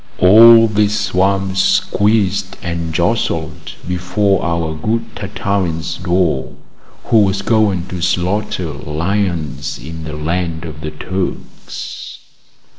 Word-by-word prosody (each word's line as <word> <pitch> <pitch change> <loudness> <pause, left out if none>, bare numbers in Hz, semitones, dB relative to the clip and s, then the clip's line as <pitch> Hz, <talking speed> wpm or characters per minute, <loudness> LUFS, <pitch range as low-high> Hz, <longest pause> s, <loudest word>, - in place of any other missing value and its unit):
All 115 +4 +8
this 105 0 +1
swarm 95 -1 0
squeezed 100 -1 +1
and 85 -2 -3
jostled 85 -4 -1
before 90 +2 0
our 85 -2 -1
good 110 +9 -3
Tartarin's 95 -5 -2
door, 85 -6 0 0.5
who 115 - +3
was 100 -1 +1
going 100 -5 +2
to 90 -1 -5
slaughter 90 -1 -1
lions 85 +1 -2
in 80 +6 -8
the 80 -1 -6
land 85 +1 -3
of 75 -1 -8
the 75 - -4
Turks. 90 +5 -6
90 Hz, 110 wpm, -17 LUFS, 80-100 Hz, 0.5 s, All